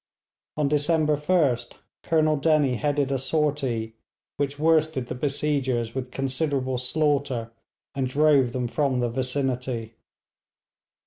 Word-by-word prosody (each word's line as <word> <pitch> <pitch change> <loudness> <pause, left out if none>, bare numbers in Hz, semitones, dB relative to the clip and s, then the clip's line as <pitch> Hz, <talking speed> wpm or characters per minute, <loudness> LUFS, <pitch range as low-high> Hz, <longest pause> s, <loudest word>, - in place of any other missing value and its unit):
On 150 -2 +2
December 150 +1 +2
1st 150 -4 +1 0.3
Colonel 155 -1 +2
Dennie 145 -4 +2
headed 145 -1 0
a 135 - 0
sortie, 135 -5 -1 0.4
which 140 0 -2
worsted 155 -3 +2
the 125 - -5
besiegers 130 -4 -1
with 130 -1 -4
considerable 135 -1 -1
slaughter 135 -4 0 0.4
and 135 -1 -1
drove 140 -3 +3
them 125 0 -2
from 135 0 0
the 120 -1 0
vicinity. 125 -2 -2
140 Hz, 115 wpm, -25 LUFS, 125-150 Hz, 0.4 s, drove